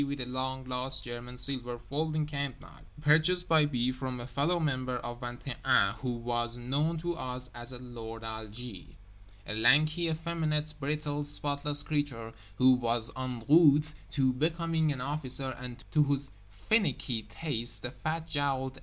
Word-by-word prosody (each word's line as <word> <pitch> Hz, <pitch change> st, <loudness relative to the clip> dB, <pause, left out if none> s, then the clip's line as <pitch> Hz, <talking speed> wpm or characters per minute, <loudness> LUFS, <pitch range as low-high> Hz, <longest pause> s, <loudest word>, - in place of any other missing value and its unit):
with 140 Hz, 0 st, -3 dB
a 125 Hz, -, -1 dB
long 130 Hz, +1 st, -3 dB
lost 130 Hz, +1 st, 0 dB
German 120 Hz, +1 st, -7 dB
silver 125 Hz, -1 st, -1 dB
folding 155 Hz, +5 st, -2 dB
camp 140 Hz, -3 st, -4 dB
knife, -, -, -16 dB, 0.2 s
purchased 160 Hz, +4 st, +4 dB
by 155 Hz, -2 st, +5 dB
B. 125 Hz, -3 st, 0 dB
from 130 Hz, -1 st, -4 dB
a 120 Hz, -, -6 dB
fellow 140 Hz, +8 st, 0 dB
member 130 Hz, -5 st, -1 dB
of 120 Hz, 0 st, -6 dB
Vingt 120 Hz, +2 st, -7 dB
et 130 Hz, -, -3 dB
Un 125 Hz, -7 st, +4 dB
who 125 Hz, -2 st, -2 dB
was 120 Hz, 0 st, -2 dB
known 145 Hz, +7 st, 0 dB
to 175 Hz, +2 st, -2 dB
us 125 Hz, -4 st, -5 dB
as 120 Hz, +1 st, -8 dB
"Lord 115 Hz, -3 st, -7 dB
Algie"—a 100 Hz, -, -8 dB
lanky, 155 Hz, +9 st, +4 dB
effeminate, 160 Hz, -2 st, -1 dB
brittle, 150 Hz, +1 st, -2 dB
spotless 145 Hz, 0 st, +3 dB
creature 135 Hz, -7 st, -2 dB, 0.2 s
who 130 Hz, +4 st, +6 dB
was 120 Hz, -2 st, +1 dB
en 130 Hz, -3 st, -4 dB
route 150 Hz, -1 st, +6 dB, 0.2 s
to 130 Hz, -3 st, +3 dB
becoming 160 Hz, +2 st, +1 dB
an 130 Hz, -3 st, -3 dB
officer 135 Hz, -1 st, 0 dB
and 125 Hz, -1 st, -7 dB
to 155 Hz, -, +4 dB
whose 140 Hz, -1 st, +1 dB, 0.2 s
finicky 125 Hz, -, 0 dB
tastes 115 Hz, +2 st, 0 dB
the 120 Hz, -, -4 dB
fat 160 Hz, +3 st, -3 dB
jowled 135 Hz, -2 st, -1 dB
A. -, -, -11 dB
130 Hz, 160 wpm, -30 LUFS, 120-150 Hz, 0.2 s, who